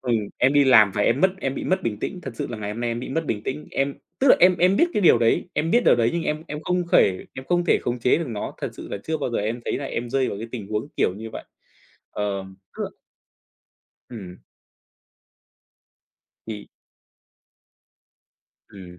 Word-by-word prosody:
Ừm, 125 -3 0 0.2
em 130 +2 +4
đi 145 -1 +5
làm 110 -6 +7
và 105 - +1
em - - +2
mất 190 0 +5
em 135 0 -2
bị - - -5
mất 185 +1 0
bình 105 -3 -2
tĩnh, 185 -2 -4
thật 135 - -5
sự - - -3
là 120 - -4
ngày 105 0 -4
hôm 115 - -6
nay 120 -1 -1
em 115 - -3
bị 125 - -6
mất 160 +2 -2
bình 105 -1 -2
tĩnh. 140 +3 -5
Em 135 0 -1 0.2
tức 270 - +3
là - - +8
em 180 0 +6
em 185 +2 +4
biết 335 - +5
cái - - +1
điều 155 - +6
đấy, 115 +9 +2
em 160 +2 -1
biết 240 - +3
điều - - +6
đấy 115 0 +2
nhưng 170 -1 -1
em 155 +1 -2
em 150 - -5
không 180 0 0
thể 95 - +3
em 130 - -8
không 175 +2 +1
thể - - +3
khống 120 0 -2
chế 125 +6 +3
được 165 - -3
nó. 105 -3 -5
Thật - - -3
sự - - -10
là 100 - -4
chưa 160 0 -1
bao 135 - -2
giờ - - -1
em 110 +4 -2
thấy - - -1
là 140 - -5
em 120 -2 -4
rơi 135 -1 +1
vào 100 - -4
cái 115 +1 -6
tình 110 -5 -5
huống 110 +6 -3
kiểu - - +2
như 110 +1 -7
vậy. - - -7 0.7
Ờ, 100 -2 -3 0.3
tức - - -3
là - - -2 1.2
Ừm. 95 -7 -10 2.0
Thì 105 -2 -7 2.0
Ừm, 90 -3 -12
125 Hz, 230 wpm, -23 LUFS, 110-160 Hz, 2.0 s, là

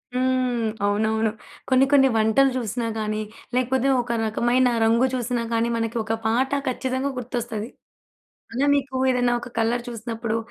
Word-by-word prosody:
హ్మ్. 255 -3 +1 0.2
అవునవును 220 +2 +1 0.4
కొన్ని, 260 0 +5
కొన్ని 270 -2 +6
వంటలు 220 +5 +4
చూసినా 235 0 -2
గాని 215 0 -2 0.3
లేకపోతే 255 +1 +1
ఒక 240 0 -5
రకమైన 240 +3 +2 0.2
రంగు 230 +3 +4
చూసినా 245 -1 -1
కానీ 230 +1 +1
మనకి 225 +1 -2
ఒక 225 +1 -2
పాట 240 +4 +1 0.2
ఖచ్చితంగా 260 +2 -1
గుర్తొస్తది. 235 -2 -4 0.8
అలా 270 +4 +1
మీకు 275 -1 -1
ఏదైనా 245 -1 +2
ఒక 240 - -8
కలర్ 235 +2 +1
చూసినప్పుడు 230 -1 -3
240 Hz, 135 wpm, -23 LUFS, 225-255 Hz, 0.8 s, కొన్ని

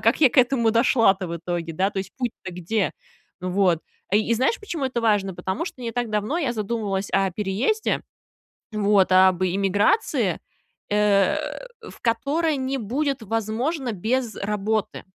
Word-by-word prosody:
как 230 +6 +2
я 265 - +7
к - - +1
этому 245 -3 +4
дошла-то 225 -5 +3
в 170 - -3
итоге, 170 0 -4
да? 190 +4 +1
То 200 - -4
есть, 190 - -5
путь-то 240 -7 -4
где?" 180 +4 -1 0.5
Вот. 180 -2 +2 0.3
И 215 +3 +3
знаешь, 260 - +1
почему 340 -9 -4
это 250 -2 -2
важно? 205 -4 +2
Потому 190 - -3
что 255 - -8
не 230 -1 -3
так 240 0 -2
давно 215 +9 -1
я 275 -8 0
задумывалась 205 -3 -2
о 195 -1 +2
переезде, 210 - 0 0.7
вот, 205 -2 +3
об 185 0 +5
иммиграции, 200 - +1 0.5
э, 205 -1 +3 0.5
в - - -14
которой 290 +7 +1
не 265 +1 -2
будет 265 +3 -2
возможно 225 - -2
без 230 +4 -1
работы, 210 +1 -2
215 Hz, 150 wpm, -24 LUFS, 195-250 Hz, 0.7 s, я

